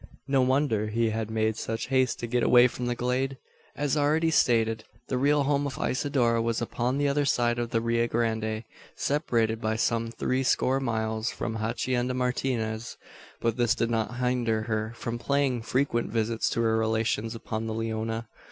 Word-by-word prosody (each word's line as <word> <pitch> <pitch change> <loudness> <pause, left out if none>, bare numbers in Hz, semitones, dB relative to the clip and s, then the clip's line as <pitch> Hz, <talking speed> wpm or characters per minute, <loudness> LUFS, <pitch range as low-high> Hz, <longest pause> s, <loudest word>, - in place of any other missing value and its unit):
No 135 -1 +3
wonder 130 -5 +2
he 115 +1 +1
had 110 0 -3
made 110 0 0
such 115 +2 -3
haste 130 -2 +2
to - - -2
get 120 +1 0
away 125 +1 +6
from 125 0 -5
the 120 - 0
glade. 130 +2 -1 0.4
As 145 0 0
already 155 +2 +2
stated, 115 -6 +2 0.3
the 130 - 0
real 145 +2 +3
home 145 0 +1
of 135 - -6
Isidora 125 -4 +1
was 115 0 0
upon 120 +2 -1
the 145 0 +2
other 145 +1 +2
side 120 -3 +1
of 120 -1 -2
the 115 - 0
Rio 115 0 +1
Grande 110 -1 -1 0.3
separated 115 -6 0
by 110 -1 0
some 115 +1 0
three 130 +3 -1
score 130 +1 +2
miles 110 -3 -1
from 115 - -4
the 110 - -4
Hacienda 120 +3 -1
Martinez. 120 -3 -2 0.4
But 115 0 0
this 120 -2 +2
did 115 -1 0
not 115 +1 -1
hinder 120 -3 0
her 110 -1 -2
from 120 0 -4
paying 140 -2 +1
frequent 125 0 0
visits 115 0 0
to 115 - -1
her 110 -1 +2
relations 110 0 0
upon 110 0 -4
the 110 - -2
Leona. 115 0 -3
115 Hz, 180 wpm, -27 LUFS, 110-130 Hz, 0.4 s, away